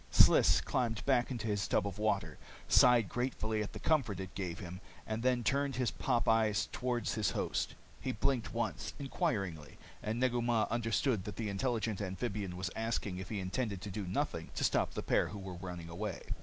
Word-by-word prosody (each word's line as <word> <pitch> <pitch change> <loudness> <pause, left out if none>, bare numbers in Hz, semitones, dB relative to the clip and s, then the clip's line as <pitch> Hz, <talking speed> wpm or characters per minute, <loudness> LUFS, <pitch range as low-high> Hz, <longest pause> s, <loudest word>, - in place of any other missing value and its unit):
Sliss - - +6
climbed 115 -4 -1
back 125 -3 +3
into 120 -5 -3
his 105 -2 0
tub - - +2
of 100 0 -4
water, 105 -2 0 0.3
sighed 120 -4 +6
gratefully 110 -2 -1
at 105 - -4
the - - -6
comfort 125 - +1
it 95 0 -6
gave 90 -3 -3
him, 90 0 -7 0.2
and 110 +1 -2
then 125 -1 +2
turned 140 +3 +1
his 125 -1 +1
pop 120 -3 0
eyes 110 -1 +3
toward 125 -1 -1
his 110 -3 +1
host. - - -1 0.2
He - - -2
blinked 130 -5 0
once, 115 -1 -2
inquiringly, 100 - -2 0.2
and 110 +2 -2
Negu 125 -1 +2
Mah 120 -2 +2
understood 115 -2 +1
that 105 - -5
the 110 -2 -2
intelligent 110 0 -1
amphibian 100 -1 -3
was 95 +1 -3
asking 110 -4 -2
if 95 - -6
he 105 - -2
intended 100 +2 -2
to 100 - -5
do 100 -1 -4
nothing 90 - -2
to - - -1
stop - - +2
the - - -2
pair - - +2
who 105 - -7
were 95 -1 -6
running 90 -1 -6
away. 95 +2 -4
110 Hz, 195 wpm, -34 LUFS, 95-120 Hz, 0.3 s, Sliss